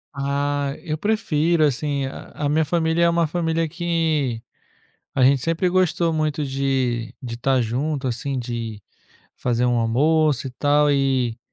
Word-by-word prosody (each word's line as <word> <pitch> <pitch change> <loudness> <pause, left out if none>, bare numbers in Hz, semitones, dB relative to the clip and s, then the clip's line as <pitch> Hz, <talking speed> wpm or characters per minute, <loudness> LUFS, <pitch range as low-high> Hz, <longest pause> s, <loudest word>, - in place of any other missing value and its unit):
Ah, 140 0 -1
eu 155 - -2
prefiro, 170 -4 +1
assim. 140 0 -1
A 140 +2 -6
a 145 - +1
minha 155 +2 +2
família 160 +1 +1
é - - +4
uma 170 0 +2
família 165 0 -1
que, 160 -8 -1 0.7
a 130 - 0
gente 135 -1 +4
sempre 165 +4 +1
gostou 175 -2 +1
muito 155 -1 -1
de 130 -4 -1
de 120 -4 -6
estar 130 +2 +1
junto, 135 +5 -2
assim, 130 +3 -2
de 115 -3 -5 0.6
fazer 120 0 0
um 120 0 +2
almoço, 145 +4 +2
e - - -9
tal, 145 +3 +2
e 130 -4 +1
145 Hz, 150 wpm, -22 LUFS, 130-160 Hz, 0.7 s, é